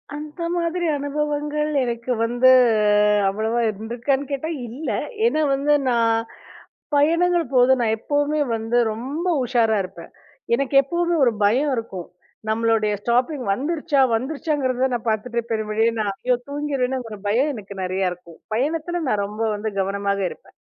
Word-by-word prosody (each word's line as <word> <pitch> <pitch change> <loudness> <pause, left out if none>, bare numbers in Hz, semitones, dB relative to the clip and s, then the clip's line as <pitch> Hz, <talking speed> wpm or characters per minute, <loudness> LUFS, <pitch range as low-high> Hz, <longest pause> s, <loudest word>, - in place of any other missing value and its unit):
அந்த 300 +3 -8
மாதிரி 345 +1 -1
அனுபவங்கள் 295 +1 -2
எனக்கு 235 0 -3
வந்து 245 +2 +3 0.8
அவ்வளவா 220 +4 -1
இருக்கான்னு 235 +6 -2
கேட்டா 280 +4 -2 0.2
இல்ல. 270 +8 -5 0.4
ஏன்னா 310 -9 +2
வந்து, 285 +2 +2 0.2
நான் 230 -2 +2 0.8
பயணங்கள் 335 +3 +3
போது, 250 +1 +5
நான் 220 -2 +2
எப்பவுமே 290 +4 0
வந்து 225 +2 -1 0.2
ரொம்ப 275 +10 -4 0.2
உஷாரா 235 -3 +2
இருப்பேன். 170 -2 -11 0.4
எனக்கு 275 +2 -1
எப்பவுமே 345 +4 0
ஒரு 240 - +3
பயம் 265 +8 +2
இருக்கும். 195 -6 -5 0.4
நம்மளுடைய 220 -1 +1
ஸ்டாப்பிங் 250 +3 0
வந்துருச்சா, 295 +4 0
வந்துருச்சான்றத 265 -1 -1
நான் 235 -1 -4
பாத்துட்டு 235 +2 -1
பெருமளவிலே 220 +1 +1
நான் 200 -2 -1 0.3
தூங்கிடுவேன்னு 275 -3 -1
ஒரு 210 - -7
பயம் 265 +8 +2
எனக்கு 200 -2 -9
நெறைய 185 0 0
இருக்கும். 170 -2 -14
பயணத்துல, 325 +7 -1
நான் 205 -1 +1
ரொம்ப 210 +2 -5
வந்து 215 +1 -3
கவனமாக 200 +1 -1
இருப்பன். - - -14
250 Hz, 130 wpm, -22 LUFS, 220-295 Hz, 0.8 s, போது